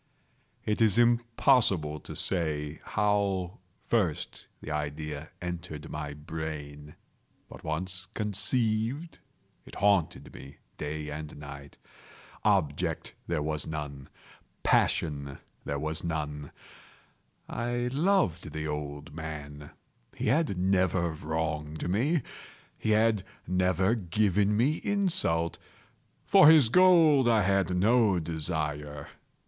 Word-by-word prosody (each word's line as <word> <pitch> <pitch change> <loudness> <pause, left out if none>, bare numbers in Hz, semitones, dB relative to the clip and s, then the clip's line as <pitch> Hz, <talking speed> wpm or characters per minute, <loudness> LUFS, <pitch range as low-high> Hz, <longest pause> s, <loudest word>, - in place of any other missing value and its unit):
It 105 +1 0
is 110 -2 +4
impossible 115 - +3
to - - -9
say 75 -4 -1
how 100 -3 0 0.3
first 95 -10 -1
the 75 - -7
idea 75 +1 -4
entered 85 -3 -6
my 75 -1 -5
brain; 75 -1 -7 0.5
but - - -12
once 90 +4 -4
conceived, 110 - -1 0.4
it - - -13
haunted 100 -5 +1
me 70 +1 -11 0.2
day 75 0 -4
and 75 0 -7
night. 70 -1 -10 0.7
Object 75 +2 0
there 80 -3 -1
was 75 -1 -2
none. 75 -3 -6 0.5
Passion 70 -3 +1 0.3
there 70 - -2
was 80 +2 -2
none. 75 -3 -4 1.0
I 120 +1 -2
loved 145 - +1
the 80 0 -3
old 75 +1 -5
man. 75 -2 -7 0.5
He - - -4
had 145 - +1
never 90 -2 +2
wronged 80 0 -3
me. 130 - +1 0.5
He - - -3
had 110 -1 +3 0.2
never 95 +2 +2
given 105 0 +1
me 140 +8 +2
insult. 175 - 0 0.7
For 150 - +8
his 155 -8 +7
gold 160 -6 +6
I 110 -3 +4
had 95 -1 +1
no 110 0 +4
desire. 75 -3 -3
85 Hz, 105 wpm, -29 LUFS, 75-110 Hz, 1.0 s, For